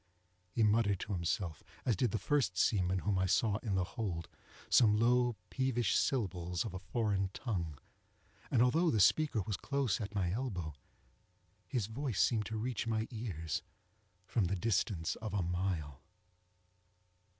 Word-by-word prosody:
He 110 Hz, +5 st, +1 dB
muttered 105 Hz, -2 st, +3 dB
to 100 Hz, -, -3 dB
himself, 85 Hz, -1 st, -2 dB, 0.2 s
as 120 Hz, -, +3 dB
did 120 Hz, +6 st, +1 dB
the 110 Hz, -, -1 dB
first 110 Hz, -4 st, +1 dB
seaman 95 Hz, -1 st, +2 dB
whom 100 Hz, -2 st, +2 dB
I 95 Hz, -, +2 dB
saw 100 Hz, +3 st, +2 dB
in 110 Hz, -4 st, -2 dB
the 95 Hz, -, +2 dB
hold, 90 Hz, -5 st, -4 dB, 0.4 s
some 105 Hz, -3 st, +5 dB
low 120 Hz, +1 st, +3 dB, 0.2 s
peevish 125 Hz, -5 st, +1 dB
syllables 90 Hz, -, 0 dB
of 110 Hz, -, -5 dB
a 95 Hz, -, -4 dB
foreign 100 Hz, -2 st, 0 dB
tongue, 90 Hz, -, -3 dB, 0.7 s
and 120 Hz, -2 st, +4 dB
although 160 Hz, +8 st, +3 dB
the 110 Hz, -, +2 dB
speaker 130 Hz, 0 st, +4 dB
was 105 Hz, -4 st, -2 dB
close 135 Hz, -5 st, 0 dB
at 105 Hz, 0 st, -5 dB
my 90 Hz, -3 st, +1 dB
elbow, 95 Hz, -9 st, -3 dB, 0.9 s
his 125 Hz, -7 st, -1 dB
voice 115 Hz, -1 st, -3 dB
seemed 110 Hz, -3 st, +2 dB
to 110 Hz, -, -3 dB
reach 115 Hz, +1 st, -2 dB
my 110 Hz, -1 st, 0 dB
ears 95 Hz, -9 st, -3 dB, 0.6 s
from 105 Hz, +1 st, +1 dB
the 95 Hz, +3 st, 0 dB
distance 95 Hz, -4 st, 0 dB
of 110 Hz, -2 st, -5 dB
a 95 Hz, -, +1 dB
mile. 85 Hz, -5 st, -2 dB
105 Hz, 155 wpm, -34 LUFS, 90-115 Hz, 0.9 s, some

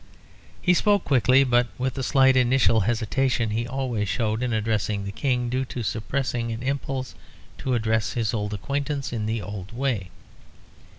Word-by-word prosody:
He 180 Hz, -, +3 dB
spoke 205 Hz, +2 st, +3 dB
quickly, 130 Hz, 0 st, +4 dB
but 120 Hz, -2 st, +3 dB
with 130 Hz, 0 st, -1 dB
the 135 Hz, -, -4 dB
slight 130 Hz, +1 st, +4 dB
initial 125 Hz, -2 st, +4 dB
hesitation 120 Hz, +2 st, 0 dB
he 115 Hz, +2 st, -1 dB
always 120 Hz, -5 st, -2 dB
showed 110 Hz, -1 st, -1 dB
in 125 Hz, -1 st, -1 dB
addressing 110 Hz, -2 st, -1 dB
the 100 Hz, -, -4 dB
King, 125 Hz, +2 st, 0 dB
due 130 Hz, +2 st, 0 dB
to 125 Hz, -1 st, -5 dB
suppressing 115 Hz, +2 st, -2 dB
an 115 Hz, +2 st, -5 dB
impulse 135 Hz, -1 st, -3 dB, 0.5 s
to 130 Hz, -2 st, 0 dB
address 110 Hz, -1 st, 0 dB
his 115 Hz, -2 st, -1 dB
old 105 Hz, -2 st, -2 dB
acquaintance 140 Hz, +3 st, -3 dB
in 110 Hz, -2 st, -2 dB
the 110 Hz, -1 st, -2 dB
old 100 Hz, -1 st, -7 dB
way. 115 Hz, -7 st, -2 dB
120 Hz, 165 wpm, -25 LUFS, 110-130 Hz, 0.5 s, quickly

